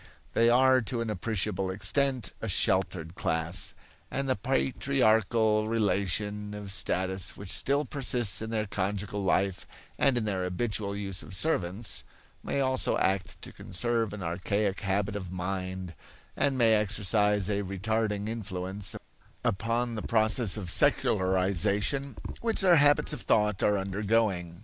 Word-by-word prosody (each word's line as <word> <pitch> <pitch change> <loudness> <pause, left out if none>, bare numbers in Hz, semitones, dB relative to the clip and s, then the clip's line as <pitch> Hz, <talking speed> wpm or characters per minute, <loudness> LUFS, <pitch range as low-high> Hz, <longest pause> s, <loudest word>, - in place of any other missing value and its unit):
They 115 +1 +4
are 130 +1 +5
to 115 +1 -3
an 115 -2 -2
appreciable 95 -1 -1
extent 115 +4 +1
a 115 - -3
sheltered 95 -4 +1
class; 80 +2 -1 0.3
and 135 0 -2
the 130 - +2
patriarchal 110 -3 +1
relation 105 -1 -1
of 100 -1 -6
status 95 -1 -1
which 100 -2 -6
still 140 +7 +1
persists 120 - +1
in 110 - -4
their 110 -1 -1
conjugal 100 0 -3
life 95 0 0 0.3
and 135 -3 +3
in 115 - -1
their 95 -3 -1
habitual 100 +2 -2
use 100 -2 -3
of 95 - -5
servants, 100 - -1 0.4
may 140 - -1
also 130 -1 +1
act 95 0 -1
to - - -4
conserve 115 +2 -1
an 105 -2 -6
archaic 95 +4 -1
habit 100 +1 -1
of 95 -3 -5
mind 95 -1 -4 0.4
and 140 -2 +1
may 115 -3 +5
exercise 105 -1 +2
a 100 -1 0
retarding 105 +2 -2
influence 100 -3 -4 0.5
upon 115 +4 0
the 110 - -4
process 110 -1 +2
of 90 -5 -3
secularization 100 - +2 0.2
which 230 -2 0
their 180 -3 +6
habits 145 0 +4
of - - -5
thought 105 -2 +1
are 105 0 +3
undergoing. 95 -3 -1
105 Hz, 140 wpm, -28 LUFS, 95-115 Hz, 0.5 s, their